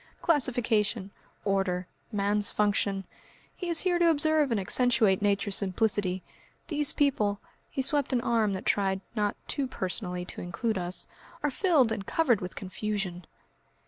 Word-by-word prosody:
Classification 230 - +1 0.3
order 195 -2 0 0.3
man's 205 0 +1
function. 200 -2 0 0.5
He 360 - -5
is 335 -1 +2
here 355 -2 +1
to 340 -1 +5
observe 310 -1 +3
and 230 -4 +1
accentuate 215 -1 +2
Nature's 200 0 +1
simplicity. 195 -1 0 0.5
These 295 -3 +4
people" 210 -8 +1 0.3
he 265 - -2
swept 285 0 +2
an 255 - +2
arm 225 -4 +1
that 190 - -5
tried 195 -1 +1
not 210 -3 0
too 275 -2 -1
personally 180 -5 -3
to - - -7
include 190 +4 -2
us 175 0 -2 0.4
"are 295 - +1
filled 295 - +3
and 215 -3 -2
covered 240 -2 +2
with 180 0 -6
confusion." 190 -3 -4
210 Hz, 145 wpm, -28 LUFS, 195-260 Hz, 0.5 s, to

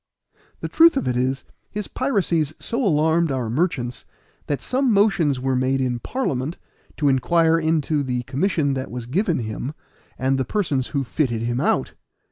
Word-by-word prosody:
The - - -2
truth 330 -3 +5
of - - -1
it 125 - 0
is, 130 +2 0 0.3
his 210 -1 -4
piracies 175 - 0
so 240 +3 -2
alarmed 160 -3 +2
our 125 -4 -2
merchants 125 -4 -1 0.4
that 145 - -1
some 260 0 +1
motions 195 -10 +3
were 130 0 0
made 130 +1 +1
in 125 -2 -1
Parliament, 150 - -2 0.4
to 150 - +1
inquire 165 +5 +3
into 160 -2 +1
the 125 -2 -2
commission 145 +2 0
that 130 -1 -4
was 120 -1 -6
given 170 - 0
him, 115 +6 -5 0.4
and 135 +1 +1
the - - +2
persons 140 - -1
who 140 -2 -1
fitted 120 -3 -1
him 120 +1 -1
out. - - +1
145 Hz, 165 wpm, -22 LUFS, 130-170 Hz, 0.4 s, truth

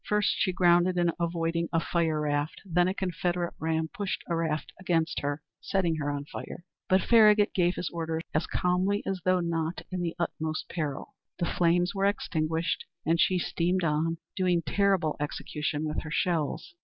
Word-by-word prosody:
First 210 -1 +2
she 185 - +2
grounded 175 0 +4
in 175 -1 +3
avoiding 170 0 -1
a 165 - +2
fire 165 -2 0
raft; 145 0 -1
then 175 -1 +2
a 185 - 0
Confederate 175 -1 -1
ram 160 0 0
pushed 195 +5 -4
a 170 - 0
raft 160 -2 -2
against 165 -3 0
her, 145 +1 -3 0.2
setting 175 -4 0
her 145 -1 -2
on 145 0 -3
fire; 175 - -8 0.2
but 185 +1 +4
Farragut 215 -3 +6
gave 180 -1 +2
his 175 - -3
orders 165 -1 -3
as 155 - 0
calmly 185 +3 +1
as 190 -2 -2
though 185 -1 +3
not 165 0 -2
in 185 -1 -2
the 170 -1 -2
utmost 160 -2 -2
peril. 150 -5 -4 0.2
The 175 - 0
flames 175 +1 +2
were 195 0 0
extinguished, 165 -4 0 0.2
and 165 +2 +3
she 185 - +3
steamed 180 +1 0
on, 165 +1 +1 0.2
doing 180 -3 +2
terrible 195 -6 +2
execution 150 +1 -3
with 155 0 -2
her 160 - -7
shells. 165 -2 -1
170 Hz, 175 wpm, -28 LUFS, 160-180 Hz, 0.2 s, Farragut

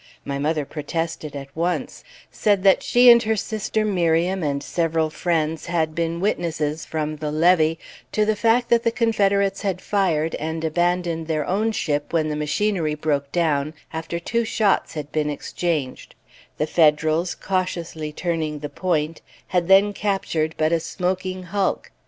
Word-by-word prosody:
My 140 0 -3
mother 150 0 0
protested, 160 +1 -4
at 140 0 -8
once; 175 +2 -2 0.3
said 200 -3 +1
that 195 -1 +5
she 245 +1 +4
and 235 0 +7
her 220 -1 0
sister 220 0 -2
Miriam, 180 -1 +1
and 140 -2 -1
several 165 -1 0
friends, 160 -1 -1
had 160 -2 0
been 170 +1 -2
witnesses, 160 -5 -1
from 155 -1 -3
the 150 0 -3
levee, 165 0 +3 0.3
to 215 - +2
the 215 0 +1
fact 230 +3 +2
that 235 -1 +4
the 230 - +2
Confederates 200 -4 +1
had 195 -3 -1
fired 170 -6 0
and 160 +1 -3
abandoned 175 0 0
their 155 -2 -1
own 215 +4 0
ship 145 -8 -2
when 155 -2 +1
the 150 - -2
machinery 155 +1 0
broke 145 -2 -1
down, 155 -3 0 0.2
after 160 +1 -4
two 235 +7 -1
shots 215 -6 +1
had 150 -1 -5
been 150 -1 0
exchanged: 150 -1 -3 0.4
the 150 - +1
Federals, 155 +2 +2
cautiously 170 -5 -3
turning 160 -2 -2
the 145 0 -6
point, 165 -3 -1 0.3
had 175 -2 +1
then 195 +2 +5
captured 190 -6 -1
but 155 0 +2
a 170 - +3
smoking 185 +2 -3
hulk. 195 +2 -2
165 Hz, 160 wpm, -22 LUFS, 155-190 Hz, 0.4 s, and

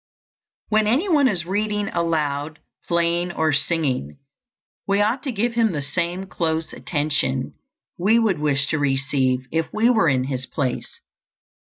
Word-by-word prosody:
When 215 -1 +3
any 275 - +2
one 295 -7 +4
is 180 -8 -1
reading 205 +2 -1
aloud, 155 -3 -1 0.3
playing, 170 +1 +1
or 160 -2 +1
singing, 145 - 0 0.7
we 200 0 +2
ought 220 +5 +1
to 275 - -3
give 230 +2 -1
him 230 -4 +2
the 150 - -2
same 175 +5 -2
close 160 -3 -2
attention 145 -4 -1 0.5
we 210 +6 +4
would 215 -8 +2
wish 140 -2 +1
to 155 - 0
receive 135 -2 +1
if 165 0 0
we 225 +3 +3
were 215 -9 +3
in 130 -2 +2
his 130 -1 -3
place. 130 -1 -3
165 Hz, 150 wpm, -22 LUFS, 145-210 Hz, 0.7 s, one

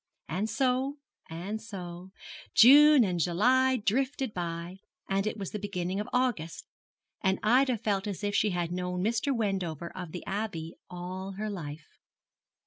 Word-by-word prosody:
And 195 +7 -2
so, 265 +3 0 0.3
and 190 +7 -5
so, 180 -4 -8 0.5
June 290 +3 +8
and 180 -4 -1
July 250 +10 +3
drifted 260 +3 0
by, 170 +1 -4 0.3
and 195 +1 0
it 215 - -2
was 195 -3 -5
the 210 - -4
beginning 190 -2 -3
of 210 - -4
August, 240 -11 -1 0.6
and 190 -1 +2
Ida 250 +3 +4
felt 205 -2 -1
as 205 0 -5
if 205 0 -1
she 210 - +3
had 175 -2 -2
known 180 0 -2
Mr. 230 +6 +1
Wendover 190 - -2
of 180 -3 -6
the 180 - -7
Abbey 190 -5 -3 0.2
all 185 +2 -6
her 210 +2 -4
life. 155 -5 -7
195 Hz, 150 wpm, -29 LUFS, 175-225 Hz, 0.6 s, June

